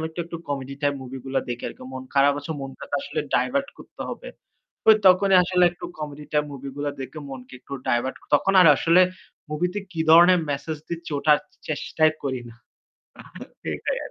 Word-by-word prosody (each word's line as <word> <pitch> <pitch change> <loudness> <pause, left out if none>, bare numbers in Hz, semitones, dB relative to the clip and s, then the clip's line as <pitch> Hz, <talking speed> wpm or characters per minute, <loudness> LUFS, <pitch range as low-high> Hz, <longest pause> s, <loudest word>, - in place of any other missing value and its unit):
আমি - - -2
একটু, 160 +2 -6
একটু 170 0 -7
comedy 140 -1 -4
type 145 -1 +1
movie 130 0 -7
গুলা 135 0 -1
দেখি 120 0 -4
আরকি। - - -12
মন 130 0 -6
খারাপ 140 +1 +5
আছে, 145 - -8
মনটাকে 135 +1 -7
আসলে 155 - -3
divert 275 +2 +1
করতে - - -10
হবে। - - -7 0.6
ওই 220 - +9
তখনই 190 +1 +5
আসলে 180 0 +2
একটু 175 - -9
comedy 150 -1 -6
type 150 0 +1
movie 140 0 -7
গুলা 145 0 -1
দেখে 145 +4 -7
মনকে 130 -2 -10
একটু 140 - -10
divert 120 +2 0 0.2
তখন 195 +7 +3
আর 165 - +7
আসলে 170 +2 +5 0.5
movie 165 +4 -1
তে 205 - -2
কি 165 - -6
ধরনের 175 +2 +8
message 150 +2 -3
দিচ্ছে 170 -1 -6
ওটা 150 +1 +2
আর - - -3 0.3
চেষ্টাই 155 +1 +1
করি 130 -2 -2
না। 115 - -14 1.1
সেটাই - - -2
আর - - -8
150 Hz, 190 wpm, -24 LUFS, 135-175 Hz, 1.1 s, ওই